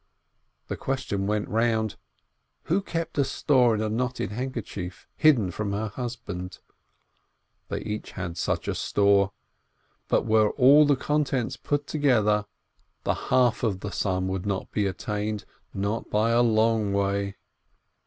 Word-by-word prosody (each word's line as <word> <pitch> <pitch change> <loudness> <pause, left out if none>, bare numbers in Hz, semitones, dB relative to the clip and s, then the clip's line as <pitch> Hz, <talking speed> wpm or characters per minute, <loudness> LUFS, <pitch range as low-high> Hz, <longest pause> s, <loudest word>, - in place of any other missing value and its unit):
The - - -4
question 115 -7 -2
went 105 0 0
round: 110 -1 +1 0.7
Who 185 +5 +1
kept 165 -5 -3
a - - +5
store 130 -3 +3
in 105 - -2
a - - 0
knotted 125 -1 -2
handkerchief, 110 -6 -5
hidden 125 - +4
from 100 0 -3
her 105 +1 -2
husband? 110 -6 -6 1.1
They - - -3
each 105 0 -5
had 85 -1 -5
such - - -2
a - - 0
store, 100 -1 +2 0.8
but - - +2
were 110 -1 +4
all 145 +3 +6
the 145 - +4
contents 135 -3 0
put 145 0 -2
together, 110 -9 +2 0.6
the - - +1 0.2
half 125 -2 +3
of 100 -5 -1
the 100 - -4
sum 95 0 -1
would 95 +1 -3
not 100 -1 -2
be 105 -2 +1
attained, 105 +2 -3 0.3
not 100 +3 -2
by 110 +2 +2
a 120 +1 +4
long 110 -2 +2
way. 100 0 0
110 Hz, 145 wpm, -26 LUFS, 100-125 Hz, 1.1 s, all